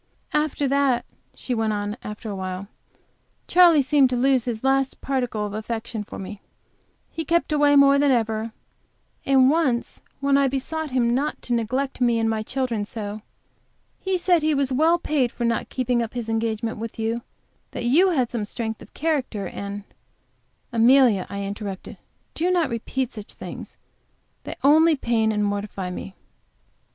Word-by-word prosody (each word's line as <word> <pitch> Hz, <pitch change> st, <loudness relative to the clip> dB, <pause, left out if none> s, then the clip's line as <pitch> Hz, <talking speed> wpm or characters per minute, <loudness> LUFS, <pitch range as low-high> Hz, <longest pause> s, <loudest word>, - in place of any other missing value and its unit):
"After 300 Hz, -1 st, 0 dB
that," 275 Hz, -2 st, +2 dB, 0.3 s
she 255 Hz, -, -4 dB
went 225 Hz, -2 st, 0 dB
on, 205 Hz, 0 st, -3 dB
after 210 Hz, +1 st, -7 dB
awhile, 190 Hz, 0 st, -5 dB, 0.8 s
"Charley 345 Hz, -5 st, +6 dB
seemed 280 Hz, -1 st, +4 dB
to 250 Hz, -, -1 dB
lose 260 Hz, -1 st, +2 dB
his 235 Hz, -2 st, -4 dB
last 270 Hz, 0 st, +1 dB
particle 245 Hz, -6 st, -2 dB
of 205 Hz, -, -5 dB
affection 220 Hz, 0 st, -4 dB
for -, -, -9 dB
me; 195 Hz, +1 st, -8 dB, 0.7 s
he 325 Hz, -, -4 dB
kept 335 Hz, +1 st, +1 dB
away 290 Hz, -1 st, +4 dB
more 280 Hz, 0 st, +6 dB
than 285 Hz, 0 st, +3 dB
ever, 225 Hz, -2 st, 0 dB, 0.8 s
and 265 Hz, -1 st, +5 dB
once 280 Hz, -7 st, 0 dB, 0.2 s
when 280 Hz, 0 st, +3 dB
I 280 Hz, -1 st, +3 dB
besought 295 Hz, +4 st, -3 dB
him 240 Hz, -2 st, +1 dB
not 290 Hz, +4 st, -1 dB
to 245 Hz, -, -2 dB
neglect 255 Hz, +4 st, -1 dB
me 240 Hz, -2 st, +3 dB
and 225 Hz, 0 st, +1 dB
my 220 Hz, -1 st, 0 dB
children 240 Hz, -2 st, -2 dB
so, 210 Hz, 0 st, -6 dB, 0.8 s
he 380 Hz, -1 st, -1 dB
said 350 Hz, -1 st, +3 dB
he 310 Hz, 0 st, +2 dB
was 275 Hz, -2 st, 0 dB
well 320 Hz, +6 st, +4 dB
paid 290 Hz, -7 st, 0 dB
for 240 Hz, -, -3 dB
not 235 Hz, 0 st, -1 dB
keeping 250 Hz, -2 st, 0 dB
up 230 Hz, +1 st, -5 dB
his 235 Hz, -2 st, -4 dB
engagement 225 Hz, 0 st, -2 dB
with 225 Hz, 0 st, -6 dB
you, 225 Hz, +1 st, -1 dB, 0.5 s
that -, -, -5 dB
you 330 Hz, +11 st, +5 dB
had 260 Hz, -9 st, 0 dB
some 235 Hz, -3 st, -2 dB
strength 220 Hz, +1 st, -4 dB
of -, -, -15 dB
character, 265 Hz, -, -1 dB
and 200 Hz, +2 st, -6 dB, 0.5 s
" -, -, -44 dB
"Amelia," 235 Hz, -4 st, +5 dB
I 200 Hz, 0 st, -4 dB
interrupted, 200 Hz, -1 st, -6 dB, 0.4 s
"do 345 Hz, +3 st, 0 dB
not 340 Hz, -7 st, +1 dB
repeat 250 Hz, +2 st, -3 dB
such 210 Hz, -2 st, -9 dB
things. -, -, -9 dB, 0.7 s
They -, -, -5 dB
only 315 Hz, +3 st, +6 dB
pain 230 Hz, -4 st, +1 dB
and 210 Hz, -1 st, 0 dB
mortify 200 Hz, -2 st, -3 dB
me." 190 Hz, +1 st, -7 dB
245 Hz, 165 wpm, -23 LUFS, 220-280 Hz, 0.8 s, Charley